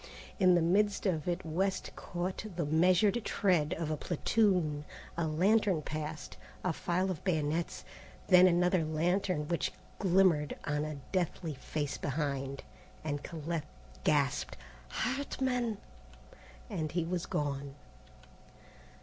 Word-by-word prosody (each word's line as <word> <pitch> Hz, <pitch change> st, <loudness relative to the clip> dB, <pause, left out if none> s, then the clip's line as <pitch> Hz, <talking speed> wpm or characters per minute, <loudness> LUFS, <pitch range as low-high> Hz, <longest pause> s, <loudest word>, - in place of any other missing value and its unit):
In 185 Hz, -2 st, +6 dB
the 175 Hz, -, +3 dB
midst 200 Hz, +5 st, +2 dB
of 165 Hz, -6 st, 0 dB
it 175 Hz, 0 st, -1 dB
West 185 Hz, +4 st, -1 dB
caught 180 Hz, +3 st, -4 dB
the 170 Hz, -2 st, -1 dB
measured 185 Hz, +8 st, +3 dB
tread 175 Hz, -5 st, +2 dB
of 160 Hz, -2 st, -2 dB
a -, -, +1 dB
platoon. 175 Hz, -3 st, +1 dB, 0.3 s
A 165 Hz, 0 st, 0 dB
lantern 185 Hz, +1 st, +3 dB
passed, 155 Hz, 0 st, -5 dB, 0.3 s
a 185 Hz, -, +1 dB
file 185 Hz, +4 st, 0 dB
of 165 Hz, -, -6 dB
bayonets, 160 Hz, -2 st, -1 dB, 0.4 s
then 180 Hz, -1 st, +7 dB
another 180 Hz, 0 st, +3 dB
lantern 160 Hz, +1 st, 0 dB
which 170 Hz, 0 st, 0 dB, 0.3 s
glimmered 180 Hz, -6 st, +3 dB
on 150 Hz, 0 st, -1 dB
a 155 Hz, -1 st, -5 dB
deathly 175 Hz, -3 st, -1 dB
face 145 Hz, +2 st, -3 dB
behind, 140 Hz, -2 st, -2 dB, 0.4 s
and 145 Hz, -2 st, -2 dB
Colette 160 Hz, -1 st, -4 dB, 0.4 s
gasped, 140 Hz, -2 st, +1 dB, 0.3 s
"Hartman!" 250 Hz, -4 st, -1 dB, 0.9 s
and 160 Hz, -, -3 dB
he 175 Hz, -1 st, 0 dB
was 180 Hz, +2 st, -2 dB
gone. 140 Hz, -1 st, -2 dB
170 Hz, 120 wpm, -32 LUFS, 150-185 Hz, 0.9 s, then